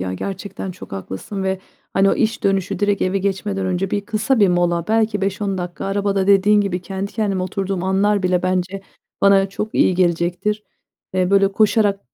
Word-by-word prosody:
ya, 95 0 -3
gerçekten 195 - -5
çok 180 - -11
haklısın 95 - -5
ve, 190 0 -1 0.4
hani, 195 0 +4
o - - +2
iş 225 -1 0
dönüşü 195 -2 0
direkt 205 -1 +1
eve 185 +1 +1
geçmeden 195 0 -2
önce 185 +1 -1
bir 205 - 0
kısa 215 +3 0
bir 200 - +6
mola, 175 -1 +1
belki, 220 -2 +1
5-10 195 0 -1
dakika 175 -1 -5
arabada 195 -1 0
dediğin 200 +1 +5
gibi 185 -3 -1
kendi 195 +2 -5
kendime 200 -4 -1
oturduğum 190 -1 -3
anlar 200 +1 +2
bile 180 -1 +1
bence 185 +1 -1 0.4
bana 195 -1 +5
çok 210 +2 -5
iyi 185 - +3
gelecektir. 180 +4 0 0.5
Eee, 185 0 +1
böyle 195 0 +4
koşarak 210 -1 +2
195 Hz, 180 wpm, -20 LUFS, 185-205 Hz, 0.5 s, bir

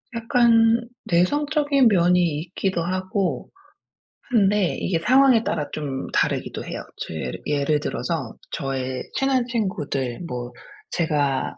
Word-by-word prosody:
약간 230 0 +4 0.2
내성적인 285 - +2
면이 180 -2 +4 0.2
있기도 180 0 -2
하고 185 - -2 0.8
한데 205 -5 +2
이게 170 -3 0
상황에 255 +2 +5
따라 150 - -2
좀 140 -3 -4
다르기도 - - -1
해요. - - -5 0.2
저 - - -6
예르 65 -5 -4
예를 145 +1 +1
들어서 - - -3 0.2
저의 130 -3 -3
친한 265 -2 +1
친구들 150 - -2
뭐 120 -2 -5 0.4
제가 145 -5 0
180 Hz, 245 characters per minute, -23 LUFS, 145-230 Hz, 0.8 s, 상황에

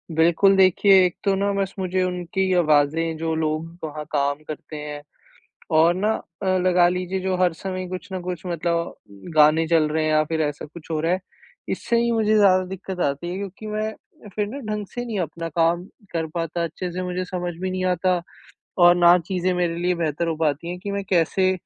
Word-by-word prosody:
बिल्कुल 170 +5 +4
देखिए, 190 0 +6
एक 180 - -1
तो 195 - +2
ना 200 +1 0
बस 195 -1 -2
मुझे 185 0 0
उनकी 185 +1 -1
आवाज़ें 160 0 +2
जो 160 0 -2
लोग 155 0 -1 0.2
वहाँ 150 -1 -5
काम 145 +1 0
करते 155 0 -7
हैं 150 -1 -6 0.8
और 165 +2 +5
ना 205 +4 0 0.3
अ, - - -3
लगा 180 -1 +4
लीजिए 180 +1 -2
जो 190 0 0
हर 180 -2 +2
समय 185 +2 -5
कुछ 180 0 -6
न 185 - -2
कुछ 180 -1 -5
मतलब 170 -1 -2 0.4
गाने 155 +2 +5
चल 160 -2 +3
रहे 155 +1 0
हैं 155 - +1
या 155 0 +4
फ़िर 160 +1 -2
ऐसा 145 -1 -2
कुछ 155 +2 -13
हो 155 - 0
रहा 165 +2 +1
है। 185 - 0 0.5
इससे 235 - 0
ही 235 0 +1
मुझे 220 -2 +2
ज़्यादा 190 -3 +5
दिक़्क़त 190 0 -6
आती 145 +2 -1
है, 180 - -4
क्योंकि 200 +2 -7
मैं 215 +1 -2 0.4
फ़िर 210 -1 0
ना 265 +7 -6
ढंग 210 -1 -3
से 245 0 -4
नहीं 220 -4 -3
अपना 165 0 -4
काम 170 +2 +1 0.3
कर 165 -1 -1
पाता, 170 0 -2
अच्छे 175 +2 -4
से 180 +2 -4
मुझे 180 0 -3
समझ 180 -1 -4
भी 185 0 -2
नहीं 185 0 -2
आता 180 0 +1 0.6
और 175 -1 +7
ना 175 0 +6
चीज़ें 185 -1 0
मेरे 175 -2 0
लिए 175 +1 0
बेहतर 165 0 -1
हो 165 - -1
पाती 155 +1 -1
हैं 180 0 -5
कि 200 +2 -5
मैं 200 0 -2
कैसे 185 +1 +2
175 Hz, 210 wpm, -23 LUFS, 160-185 Hz, 0.8 s, और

